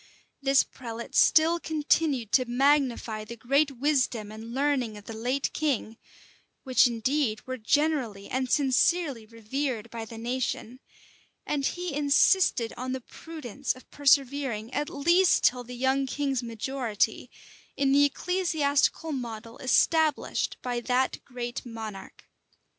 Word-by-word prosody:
This 275 0 +4
prelate 235 -2 -8
still 330 +2 +5
continued 300 -7 0
to 255 - +4
magnify 250 -4 +1
the 235 +2 -8
great 275 +3 +1
wisdom 250 -6 0
and 220 +2 -9
learning 260 -4 0
of 205 - -13
the 225 - -7
late 250 +5 -2
king, 275 -7 -1 0.7
which, 255 -2 +4
indeed, 235 0 -1
were 255 0 -5
generally 245 -5 0
and 260 0 -2
sincerely 280 -2 +1
revered 230 +1 -4
by 230 -1 -5
the 225 0 -10
nation; 245 +1 -3 0.7
and 280 -2 0
he 350 -2 -4
insisted 285 - +3
on 255 +1 -4
the 260 - -4
prudence, 280 -2 -5
of 255 - -17
persevering, 270 -5 +1
at 295 +1 -1
least 340 +6 +3
till 250 0 +3
the 250 +1 -9
young 265 +2 +1
king's 275 -2 -1
majority, 235 -1 -2 0.5
in 275 -1 +2
the 285 +1 +5
ecclesiastical 315 -1 0
model 230 -4 -6
established 310 +3 +1
by 245 -1 -2
that 250 +2 0
great 245 -1 -5
monarch. 220 -4 -8
260 Hz, 130 wpm, -27 LUFS, 230-285 Hz, 0.7 s, still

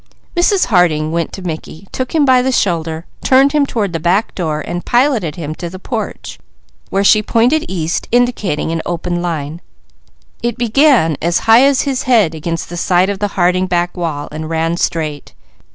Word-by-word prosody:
Mrs. 365 +2 +3
Harding 165 -7 +2
went 170 -1 -2
to 190 - -8
Mickey, 160 +1 -7
took 255 +4 -4
him 300 -3 +4
by 255 -2 +5
the 260 +1 0
shoulder, 165 -7 -1 0.2
turned 270 +2 +4
him 290 -2 +2
toward 205 -8 -2
the 165 - -2
back 180 +7 +1
door 155 -4 -2
and 175 +3 -5
piloted 240 - +1
him 155 -3 -5
to 170 +2 -6
the 185 - -9
porch, 220 +3 -6 0.5
where 195 +1 0
she 210 +1 +5
pointed 240 +8 +2
east 170 -3 -2
indicating 235 -10 0
an 165 0 -2
open 175 0 -3
line. 165 -2 -4 0.8
It 240 0 -2
began 240 - +3
as 170 +1 +1
high 225 +2 +7
as 275 -2 +3
his 270 -3 -1
head 215 -10 +4
against 165 +1 -4
the 175 - -7
side 180 +2 +2
of 195 - -5
the 205 - 0
Harding 185 +1 +2
back 175 -1 -1
wall 160 -5 -3
and 155 +1 -6
ran 165 +1 0
straight. 155 -4 -3
180 Hz, 185 wpm, -15 LUFS, 165-240 Hz, 0.8 s, high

